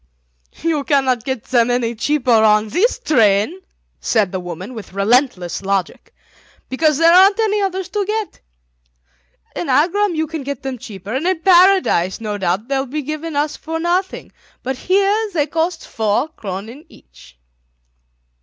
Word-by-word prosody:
"You 320 -3 0
cannot 260 -5 +1
get 260 -4 -3
them 240 -1 +2
any 245 -1 0
cheaper 255 +2 0
on 215 -1 +4
this 405 - +1
train," 235 - +2 0.4
said 210 -5 +1
the 190 - -3
woman, 180 +6 -7
with 220 -5 -10
relentless 200 -3 +1
logic, 195 -2 -3 0.6
"because 305 +2 +1
there 330 +1 +5
aren't 390 +3 +6
any 420 -2 +1
others 380 -2 -2
to 415 +1 -1
get. 430 -1 -3 1.2
In 175 - -4
Agram 345 +8 +2
you 315 0 0
can 315 -2 -6
buy 280 +1 -3
them 260 -1 -6
cheaper, 210 -4 -8
and 280 +7 -1
in 370 -3 0
Paradise 360 - +4
no 210 -2 -4
doubt 190 +4 -1
they 275 -1 0
will 270 - -3
be 295 +4 -4
given 310 +3 -5
to 285 - +2
us 300 0 -3
for 325 0 -5
nothing, 355 +3 -2 0.3
but 265 +1 -2
here 400 - +1
they 295 -3 +2
cost 325 +2 -2
four 220 +7 -1
kronen 220 +3 -8
each. 60 - -19
275 Hz, 160 wpm, -18 LUFS, 220-345 Hz, 1.2 s, aren't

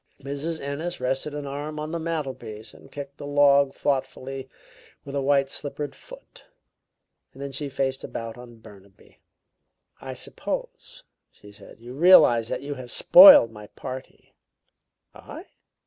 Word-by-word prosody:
Mrs. 145 +4 -5
Ennis 155 +6 -5
rested 135 +3 -3
an 145 -1 -5
arm 145 +2 -6
on 155 +1 -5
the 170 - -3
mantelpiece 135 -9 -6
and - - -18
kicked 140 -1 -9
a - - -6
log 140 -1 +4
thoughtfully 135 -1 -4 0.6
with 140 - -9
a 140 - -1
white 140 0 +2
slippered 145 0 -6
foot; - - -15 0.9
then 140 +1 -7
she 140 +2 -4
faced 135 0 -2
about 115 -1 -7
on 120 -1 -13
Burnaby. 100 -3 -19 0.8
"I - - -7
suppose," - - -7 0.3
she 105 - -17
said, 100 - -16
"you 120 +2 -11
realize 135 -8 +5
that - - -4
you 145 +1 -5
have 130 -3 -10
spoiled 275 - +8
my 105 -1 -12
party?" 130 +3 -10 0.8
"I?" - - -11
140 Hz, 140 wpm, -24 LUFS, 130-145 Hz, 0.9 s, spoiled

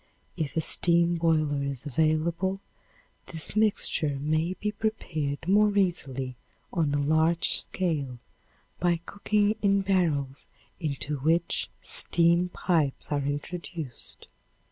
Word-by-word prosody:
If 160 -3 -3
a - - +3
steam 170 +2 +4
boiler 155 -3 +1
is 140 -1 -3
available, 160 +6 0 0.7
this 160 +4 -2
mixture 200 -9 +2
may 155 +5 0
be 210 +2 -2
prepared 160 -9 -3
more 205 +1 +4
easily 135 -9 -1 0.4
on 160 -5 +1
a - - +1
large 160 +3 +2
scale 150 -9 -2 0.6
by 175 -1 +2
cooking 210 +1 0
in 200 -1 +3
barrels 160 -8 0 0.3
into 150 -2 -3
which 165 +5 +1
steam 170 +1 +3
pipes 160 -7 -1
are 145 -1 +1
introduced. 145 0 -5
165 Hz, 110 wpm, -27 LUFS, 145-180 Hz, 0.7 s, steam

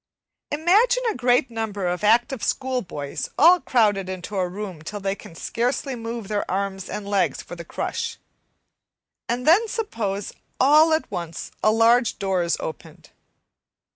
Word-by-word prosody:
Imagine 410 +11 +3
a - - -6
great 250 0 +2
number 215 -4 -3
of 180 +2 -2
active 235 +3 +3
schoolboys 245 - -3
all 350 +4 +7
crowded 205 -6 +2
into 190 +2 -6
a 185 -2 +1
room 190 -4 -6
till 205 +6 -6
they 195 0 -1
can 200 -3 -12
scarcely 250 - -2
move 230 -2 -6
their 205 0 -2
arms 195 0 -2
and 205 -1 -5
legs 200 -2 0
for 175 - -9
the 170 - -8
crush, - - -4 1.1
and 245 +2 -1
then 380 +9 +5
suppose 215 - -3 0.3
all 305 +5 +6
at 315 -7 0
once 170 -4 -5
a - - +5
large 230 +2 +3
door 190 -3 0
is 170 0 0
opened. 160 - -8
215 Hz, 150 wpm, -23 LUFS, 190-255 Hz, 1.1 s, all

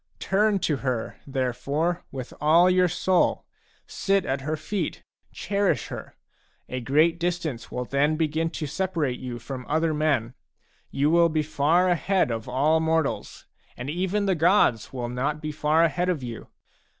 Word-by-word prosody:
Turn 205 +1 +2
to 150 - +1
her, 125 -4 -3
therefore, 140 +6 -1
with 130 -2 -7
all 170 +4 +5
your 185 0 +4
soul, 180 +1 +1 0.4
sit 195 0 0
at 135 0 -1
her 155 +3 -2
feet, 200 +6 -4 0.3
cherish 200 -1 -1
her; - - -8 0.5
a 130 - -4
great 155 +7 +2
distance 170 -9 -3
will 125 - -3
then 145 +4 +1
begin 160 +1 0
to 160 -1 -5
separate 155 -4 -2
you 125 -2 -5
from 125 +2 -7
other 160 +1 +1
men. 145 -6 0 0.6
You 145 +3 +1
will 170 0 +5
be 155 -1 0
far 155 +4 +2
ahead 180 -3 +1
of 115 +2 -4
all 150 +5 +2
mortals, 160 -2 -1 0.3
and 125 +4 -4
even 190 +4 -1
the 195 - +2
gods 165 - +3
will 125 -2 -4
not 135 +5 -2
be 155 0 -4
far 155 +2 +2
ahead 175 +3 +1
of 160 -7 -1
you. 120 -2 -7
155 Hz, 160 wpm, -25 LUFS, 135-175 Hz, 0.6 s, all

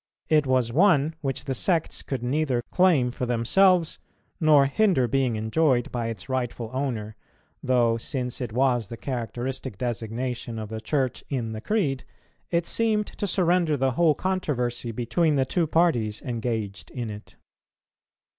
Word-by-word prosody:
It 150 -3 +3
was 130 -3 +1
one 160 -2 +4
which 135 -3 -3
the 135 - -1
sects 165 +3 0
could 130 -4 -4
neither 130 -1 0
claim 165 -10 +3
for 125 0 -4
themselves, 170 +9 +3 0.4
nor 150 -4 +5
hinder 140 - +2
being 130 -1 +1
enjoyed 120 +3 +1
by 120 -2 -2
its 110 -6 -6
rightful 120 -3 -3
owner, 115 -6 -3 0.5
though, 120 -3 +2
since 125 +2 -4
it 120 -3 -3
was 120 -2 +1
the 115 - -8
characteristic 125 -1 -4
designation 120 +1 -3
of 110 -1 -5
the 110 0 -5
Church 130 +1 -1
in 120 -5 -2
the 110 0 -6
Creed, 145 - 0 0.5
it 170 -1 +1
seemed 215 0 +1
to 205 - -5
surrender 175 -4 +2
the 135 0 +1
whole 155 +3 +3
controversy 125 -11 -2
between 145 +8 +1
the 135 -1 +2
two 170 +4 0
parties 125 -11 +1
engaged 115 -5 -3
in 120 -4 -5
it. 105 0 -11
130 Hz, 150 wpm, -25 LUFS, 115-155 Hz, 0.5 s, nor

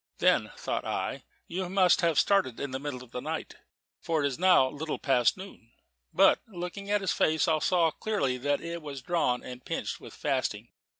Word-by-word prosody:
"Then," - - +3
thought - - -3
I, - - -3 0.2
"you 180 +1 -3
must 185 -2 +4
have 165 -4 +2
started 195 - +2
in 140 - -4
the 130 - -3
middle 135 -3 -5
of 125 - -17
the 125 - -5
night," - - -5 0.4
for 160 -2 -1
it - - +1
was 140 0 -2
now 180 -7 +5
little 150 +3 -4
past 130 -2 +2
noon. 185 -12 -12 0.4
But - - +5
looking 195 0 -6
at 205 0 +2
his 190 - 0
face, 155 +1 +2
I 160 -1 +3
saw 170 0 +2
clearly 140 -11 -1
that 145 +2 0
it 170 0 -5
was 140 -4 -7
drawn 135 -7 0
and 125 0 -9
pinched - - -4
with - - -11
fasting. - - -2
160 Hz, 195 wpm, -29 LUFS, 130-180 Hz, 0.4 s, now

